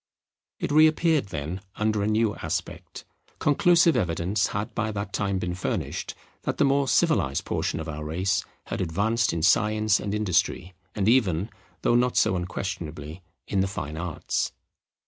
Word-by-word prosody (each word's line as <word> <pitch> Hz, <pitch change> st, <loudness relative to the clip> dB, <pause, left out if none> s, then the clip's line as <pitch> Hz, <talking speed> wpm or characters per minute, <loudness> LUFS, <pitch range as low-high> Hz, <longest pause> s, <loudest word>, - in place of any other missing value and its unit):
It -, -, -2 dB
re 155 Hz, +2 st, +7 dB
appeared 155 Hz, -, +2 dB
then 80 Hz, +2 st, -5 dB
under 105 Hz, -1 st, 0 dB
a 100 Hz, -, 0 dB
new 110 Hz, 0 st, +2 dB
aspect. -, -, -5 dB, 0.3 s
Conclusive 165 Hz, +2 st, +4 dB
evidence 90 Hz, -1 st, 0 dB
had 105 Hz, +1 st, -4 dB
by 110 Hz, 0 st, -1 dB
that 100 Hz, -1 st, -5 dB
time 100 Hz, -2 st, 0 dB
been 90 Hz, -1 st, -2 dB
furnished 90 Hz, -, -3 dB, 0.3 s
that -, -, -3 dB
the -, -, +4 dB
more 140 Hz, 0 st, +2 dB
civilized 125 Hz, -, +2 dB
portion -, -, -1 dB
of 80 Hz, -, -5 dB
our 75 Hz, -1 st, -5 dB
race 90 Hz, +6 st, 0 dB, 0.2 s
had -, -, -4 dB
advanced 105 Hz, +7 st, +1 dB
in 85 Hz, -1 st, -2 dB
science 110 Hz, +2 st, +3 dB
and 100 Hz, 0 st, -3 dB
industry, 95 Hz, -2 st, 0 dB, 0.2 s
and 100 Hz, -1 st, 0 dB
even, 105 Hz, -5 st, +2 dB, 0.3 s
though -, -, +3 dB
not 125 Hz, +1 st, +2 dB
so 110 Hz, -3 st, +3 dB
unquestionably, 85 Hz, -3 st, -5 dB, 0.3 s
in 100 Hz, -, 0 dB
the 95 Hz, -, +2 dB
fine 75 Hz, -6 st, -5 dB
arts. 85 Hz, 0 st, -2 dB
100 Hz, 160 wpm, -26 LUFS, 90-115 Hz, 0.3 s, re